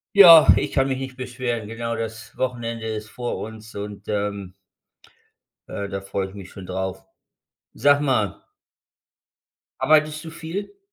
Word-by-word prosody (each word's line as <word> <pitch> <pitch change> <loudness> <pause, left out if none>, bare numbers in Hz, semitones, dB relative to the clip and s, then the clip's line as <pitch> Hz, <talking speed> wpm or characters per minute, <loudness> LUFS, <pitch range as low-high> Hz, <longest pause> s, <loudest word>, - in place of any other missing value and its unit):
Ja, 170 -6 +10
ich - - -1
kann 135 -1 +2
mich 130 -1 -1
nicht 130 -1 -6
beschweren. 120 -3 -3
Genau, 115 +1 -4
das 115 0 -6
Wochenende 115 -3 -3
ist 110 -1 -5
vor 120 -1 -4
uns, 110 0 -9
und, 100 0 -7
ähm 100 -2 -3 1.2
äh, 100 - -4
da 100 0 -5
freue 95 0 -3
ich 95 - -13
mich 95 -2 -10
schon 95 -1 -10
drauf. 95 0 -4 0.7
Sag 145 0 +4
mal 125 -9 0 1.4
arbeitest 155 +2 +3
du 165 - -7
viel? 180 - -6
115 Hz, 145 wpm, -23 LUFS, 100-135 Hz, 1.4 s, Ja